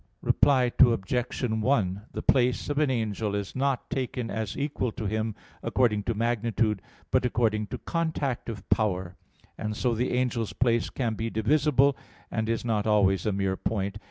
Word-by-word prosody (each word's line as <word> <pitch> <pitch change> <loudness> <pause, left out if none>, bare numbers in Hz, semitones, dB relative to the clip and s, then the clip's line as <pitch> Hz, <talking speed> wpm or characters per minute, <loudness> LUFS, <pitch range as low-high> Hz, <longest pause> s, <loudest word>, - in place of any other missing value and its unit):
Reply 130 -4 +4
Obj. 120 +1 +3 0.2
1: 105 -6 +1
The - - -4
place 125 +2 +2
of 145 - 0
an 150 -2 +3
angel 110 -4 -1
is 100 -1 -4
not 135 -1 0
taken 125 -3 -2
as 110 -1 -3
equal 140 -4 -1
to 110 - -5
him 110 +1 -1 0.3
according 115 -5 +2
to 115 - -1
magnitude, 115 -2 0 0.3
but - - +3
according 110 -3 +1
to - - -5
contact 155 -8 -2
of 100 -4 -7
power: 95 -4 +1 0.4
and 105 0 -3
so 125 -2 +1
the 125 +2 0
angel's 120 -3 -1
place 120 -2 +1
can 120 -4 -1
be 110 +1 -3
divisible, 140 +4 +3 0.4
and 110 0 -1
is 115 +1 -1
not 110 -2 0
always 100 -3 +3
a - - +2
mere 95 -1 0
point. 100 0 -2
115 Hz, 165 wpm, -27 LUFS, 105-125 Hz, 0.4 s, Reply